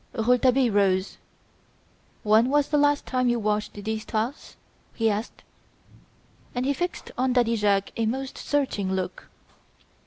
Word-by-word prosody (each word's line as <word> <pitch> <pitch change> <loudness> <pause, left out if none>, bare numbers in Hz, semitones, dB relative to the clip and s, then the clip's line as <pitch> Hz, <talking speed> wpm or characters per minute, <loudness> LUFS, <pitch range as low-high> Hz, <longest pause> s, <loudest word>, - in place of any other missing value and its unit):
Rouletabille 250 +2 +3
rose. 195 -2 +1 1.1
"When 220 +3 +4
was 290 0 +2
the 300 - +2
last 290 0 +2
time 255 -1 0
you 240 - +2
washed 210 -1 -1
these 215 +1 -4
tiles?" 230 +5 -4 0.4
he 225 -1 +2
asked, 210 +3 -5 1.1
and 245 +1 -1
he 280 - +2
fixed 355 +5 -4
on 255 0 +2
Daddy 240 -2 +2
Jacques 200 -2 +1
a 225 -1 0
most 265 +3 -3
searching 235 -10 -1
look. 185 -1 -4
230 Hz, 135 wpm, -25 LUFS, 210-260 Hz, 1.1 s, When